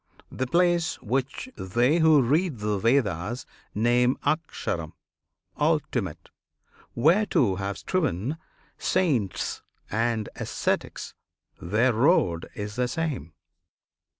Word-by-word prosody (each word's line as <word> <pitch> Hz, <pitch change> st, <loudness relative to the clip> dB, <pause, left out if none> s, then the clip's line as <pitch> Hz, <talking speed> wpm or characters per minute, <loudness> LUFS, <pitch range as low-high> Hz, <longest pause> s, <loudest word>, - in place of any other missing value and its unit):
The 130 Hz, -, -2 dB
place 175 Hz, +2 st, +2 dB
which 130 Hz, -, -2 dB
they 120 Hz, -, +1 dB
who 160 Hz, -4 st, +6 dB
read 150 Hz, +3 st, +1 dB
the 105 Hz, -1 st, -1 dB
Vedas 115 Hz, -, +1 dB, 0.3 s
name 120 Hz, +3 st, +3 dB
AKSHARAM, 90 Hz, -, -2 dB, 0.7 s
"Ultimate;" 120 Hz, -, -1 dB, 0.6 s
whereto 145 Hz, -, +3 dB
have 100 Hz, +1 st, -3 dB
striven 145 Hz, -, -1 dB, 0.4 s
Saints 140 Hz, -, 0 dB, 0.3 s
and 115 Hz, -1 st, 0 dB
ascetics -, -, -2 dB, 0.5 s
their 110 Hz, +8 st, +2 dB
road 110 Hz, -, +2 dB
is 105 Hz, +2 st, -5 dB
the 125 Hz, 0 st, +1 dB
same. 140 Hz, -, -3 dB
125 Hz, 95 wpm, -26 LUFS, 105-155 Hz, 0.7 s, who